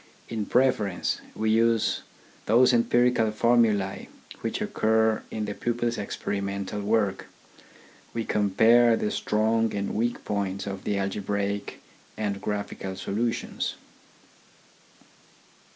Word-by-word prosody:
In 110 -3 -3
preference, 115 -7 +1
we 110 0 0
use 115 0 +2 0.5
those 125 +4 +5
empirical 120 -1 +3
formulae 110 -3 +2 0.3
which - - -3
occur 110 0 +1
in 110 -1 -3
the 105 - -4
pupil's 120 +1 -2
experimental 100 0 -3
work. 100 -2 0 0.8
We 115 -1 -3
compare 115 +3 +4
the 105 - -1
strong 110 +1 +1
and 100 -1 -2
weak 120 +3 -1
points 100 -1 -2
of 95 -1 -6
the 100 - 0
algebraic 100 +1 -2 0.3
and 100 -2 -2
graphical 100 -2 -4
solutions. 115 +5 -2
105 Hz, 105 wpm, -26 LUFS, 100-115 Hz, 0.8 s, those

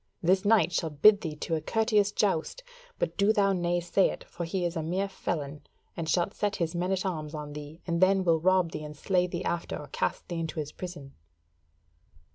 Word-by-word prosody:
This 185 +3 +3
knight 200 -6 +4
shalt 155 -4 -3
bid 210 -1 +8
thee 155 -4 -4
to 165 - -4
a 160 - 0
courteous 215 +2 +2
joust; 205 - 0 0.3
but - - -2
do 200 +2 +4
thou 200 -2 +3
nay 175 -1 0
say 175 +3 +2
it, - - -7
for 170 - -6
he 175 +2 -2
is 170 +1 -2
a 165 - -1
mere 180 +5 -1
felon, 150 -6 -4 0.3
and 165 -2 -4
shalt 180 +4 +1
set 205 -1 -1
his 165 -1 -1
men 180 +2 -1
at 190 0 0
arms 155 -4 -3
on 150 -1 -6
thee, 150 +3 -9
and 170 0 -1
then 190 0 +4
will 165 -2 +3
rob 185 0 +3
thee 155 - -5
and 150 0 -8
slay 180 +2 +1
thee 175 0 -4
after, 170 -1 -2
or 145 - -9
cast - - -2
thee 175 -2 -3
into 160 0 -3
his 150 -1 -4
prison." 170 -7 -8
175 Hz, 220 wpm, -28 LUFS, 160-190 Hz, 0.3 s, bid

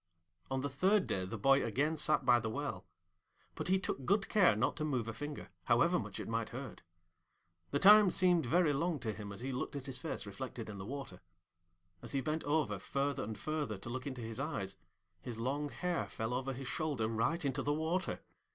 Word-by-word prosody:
On 130 0 -1
the 140 - -1
third 185 +9 +3
day 95 -1 -1
the 110 +5 -5
boy 135 +6 +4
again 140 +8 +1
sat 150 0 +2
by 120 - +6
the 115 -1 -3
well; 110 -8 -4 0.7
but - - -4
he 190 +1 +4
took 160 -7 -3
good 200 +6 +2
care 185 - +5
not 110 +5 +1
to 155 - -2
move 130 -7 -1
a 115 - -3
finger, 145 +5 -6 0.2
however - - +4
much - - -6
it - - -5
might - - -1
hurt. - - -7 0.9
The - - +1
time 210 +4 +8
seemed 175 -5 +3
very 165 +2 +4
long 165 +3 0
to 110 -2 -2
him 100 0 -7
as 100 - -7
he 135 +2 -3
looked 130 +2 -3
at 140 -2 -5
his 130 -2 -5
face - - -4
reflected 115 +2 -6
in 100 -2 -7
the 95 - -6
water. 130 -9 -6 0.8
As - - -5
he 135 - +1
bent 155 +4 -2
over 145 -9 +1
further 140 +7 -1
and 110 0 -5
further 150 -9 -2
to 95 - -8
look 130 +2 -4
into 130 -3 -5
his 115 +1 -4
eyes, 105 -10 -3 0.5
his 115 +4 -6
long 140 +5 -1
hair 175 +7 -2
fell 115 +2 -3
over 135 +2 -1
his 130 +1 -6
shoulder 145 -7 -1
right 115 +9 0
into 135 -2 0
the 145 - 0
water. 160 +5 -1
135 Hz, 215 wpm, -35 LUFS, 115-155 Hz, 0.9 s, time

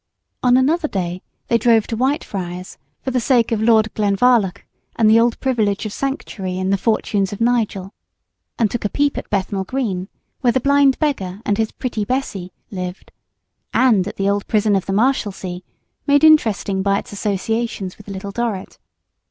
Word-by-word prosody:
On 250 0 +4
another 305 +5 +2
day 180 - -3 0.3
they 235 - +2
drove 230 -3 +4
to 225 - -4
Whitefriars, 190 -8 -3 0.2
for 260 - -2
the 255 - +1
sake 240 -1 +2
of 220 -2 0
Lord 220 -1 +3
Glenvarloch 205 -1 +2 0.3
and 225 - +3
the 220 +1 +6
old 235 0 +2
privilege 220 -6 0
of 210 - -4
Sanctuary 200 -9 -4
in 185 +1 -1
the 200 - +3
"Fortunes 205 -3 0
of 205 - -6
Nigel;" 225 -5 0 0.6
and 220 -4 +1
took 240 - -3
a 205 - 0
peep 285 +4 +1
at - - -6
Bethnal 195 -1 -1
Green, 195 -5 -2 0.3
where 245 -3 +2
the 260 - +2
Blind 280 0 +4
Beggar 200 - -2
and 205 +1 0
his 220 -1 0
"Pretty 235 -5 -3
Bessee" 205 -7 -3 0.2
lived, 180 -1 -6 0.6
and 220 -7 +4
at - - -6
the 195 - -1
old 200 0 0
Prison 210 -1 +2
of 190 - -1
the 195 - -1
Marshalsea, 200 -6 0 0.5
made 285 +1 +4
interesting 220 -11 +4
by 200 0 +2
its 240 - -7
associations 205 0 -2
with 210 - -14
"Little 200 0 -6
Dorrit." 225 -3 -4
215 Hz, 175 wpm, -20 LUFS, 195-245 Hz, 0.6 s, the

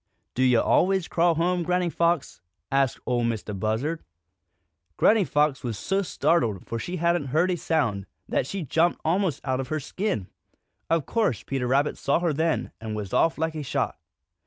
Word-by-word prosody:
"Do 130 - -2
yo' 125 -3 +5
always 190 -1 +2
crawl 170 0 +2
home, 175 +2 +1
Granny 180 0 0
Fox?" 170 - 0 0.3
asked 135 -2 +1
Ol' 120 -1 0
Mistah 115 -2 -2
Buzzard. 110 - -2 0.9
Granny 220 -1 +5
Fox 150 -4 +1
was 115 -4 -3
so 195 - 0
startled, 120 - 0
for 115 - -4
she 175 +9 -4
hadn't 170 -3 +1
heard 160 +7 +2
a - - +1
sound, 115 - -1 0.2
that - - 0
she 195 +2 -4
jumped 165 +5 +1
almost 175 -2 +1
out 130 -1 0
of 135 - -3
her 155 +3 -2
skin. 145 - -2 0.6
Of 165 -4 +1
course 220 - 0
Peter 135 -2 -2
Rabbit 140 +4 +1
saw 140 - +2
her 170 -3 0
then, 160 +2 0
and 110 -1 -4
was 105 -3 -5
off 165 - +3
like 160 +1 -1
a 155 - -4
shot. 140 - -2
155 Hz, 180 wpm, -25 LUFS, 125-170 Hz, 0.9 s, yo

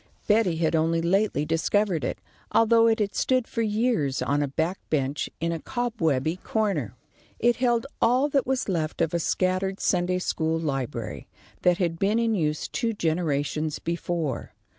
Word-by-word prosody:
Betty 210 -5 +3
had 160 0 +1
only 165 +1 +2
lately 175 -2 +1
discovered 170 +3 +1
it, - - -2 0.3
although 230 0 +5
it 225 -1 +3
had 205 -3 -1
stood 255 -2 +1
for 230 - -2
years 210 - 0
on 145 +1 +1
a 145 - 0
back 160 +7 -2
bench 140 -1 -1
in 165 +1 -1
a 165 - -2
cobwebby 165 - -1
corner. 185 - -1 0.4
It 240 +1 +2
held 240 -2 +1 0.2
all 255 +5 +4
that 275 -3 +1
was 265 -1 0
left 160 -5 -2
of 165 -1 +1
a 170 - +1
scattered 185 +3 0
Sunday 180 0 +1
school 160 -3 -1
library, 135 -6 -3 0.3
that 180 -1 +3
had 170 -3 -1
been 205 +3 +2
in 230 -1 +2
use 155 -6 -1
two 230 -2 -1
generations 155 -4 -1
before. 170 -3 -3
175 Hz, 160 wpm, -26 LUFS, 160-220 Hz, 0.4 s, although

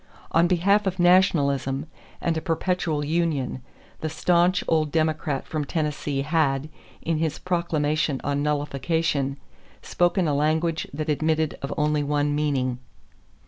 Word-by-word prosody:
On 165 +1 +4
behalf 195 +3 +2
of 185 -1 -1
nationalism 150 -7 +3 0.4
and 170 -1 0
a 160 - -2
perpetual 165 -3 -1
union, 150 -5 -1 0.4
the 155 - -3
stanch 175 +3 +2
old 155 -2 +1
Democrat 155 -3 0
from 155 -2 -3
Tennessee 145 -2 -2
had, 150 -2 +1 0.3
in 165 -1 0
his 160 -2 -1
proclamation 155 -5 0
on 145 0 -1
nullification, 145 -1 -1 0.5
spoken 175 0 +1
a 150 - +1
language 155 +3 0
that 155 +2 -4
admitted 155 +1 0
of 140 - -4
only 150 0 +1
one 145 0 0
meaning. 135 -4 0
155 Hz, 130 wpm, -24 LUFS, 145-170 Hz, 0.5 s, On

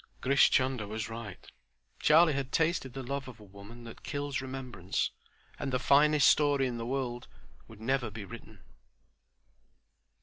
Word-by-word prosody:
Grish 140 +2 +4
Chunder 130 -5 +1
was 110 +1 -4
right. 115 -4 -8 0.5
Charlie 160 +1 +5
had 135 -1 -3
tasted 160 -6 0
the 135 0 -6
love 135 +1 -4
of 120 -3 -11
woman 105 +3 -13
that 115 -1 -11
kills 145 -1 -3
remembrance, 130 -8 -3 0.5
and 135 - -3
the 130 - +1
"finest 145 +3 +4
story" 145 -2 +4
in 125 -2 -3
the 115 - -4
world 125 -2 -3 0.4
would 110 -2 -14
never 120 +1 -1
be 105 -1 -8
written. 110 -2 -12
130 Hz, 145 wpm, -30 LUFS, 115-140 Hz, 0.5 s, Charlie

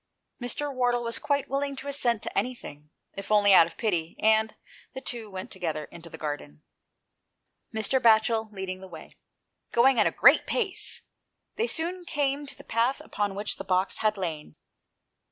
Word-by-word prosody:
Mr. 280 +4 -2
Wardle 245 -1 +1
was 230 0 -3
quite 285 -1 0
willing 275 0 -2
to 270 +1 -7
assent 245 -6 +1
to - - -3
anything, 150 -12 -4 0.2
if 195 +1 -8
only 205 -1 +5
out 165 -3 +8
of 170 - -14
pity, 170 -7 -1
and 220 0 +3 0.4
the - - -4
two 235 -4 -5
went 190 -1 -7
together 160 -5 -3
into 170 0 -11
the - - -9
garden, 145 - -6 1.1
Mr. 220 +4 +1
Batchel 220 -1 +3
leading 190 -2 -6
the 190 - -9
way. 165 -3 -11 0.6
Going 245 +1 +4
at 210 - +5
a - - 0
great - - +5
pace, 405 -7 0 0.5
they 455 +2 0
soon 355 0 -1
came 290 -3 -1
to - - -6
the - - -13
path 235 +4 0
upon 205 -2 -3
which 205 +1 -2
the - - -6
box 185 0 0
had 215 -1 +1
lain. 160 - -5
220 Hz, 170 wpm, -27 LUFS, 185-265 Hz, 1.1 s, out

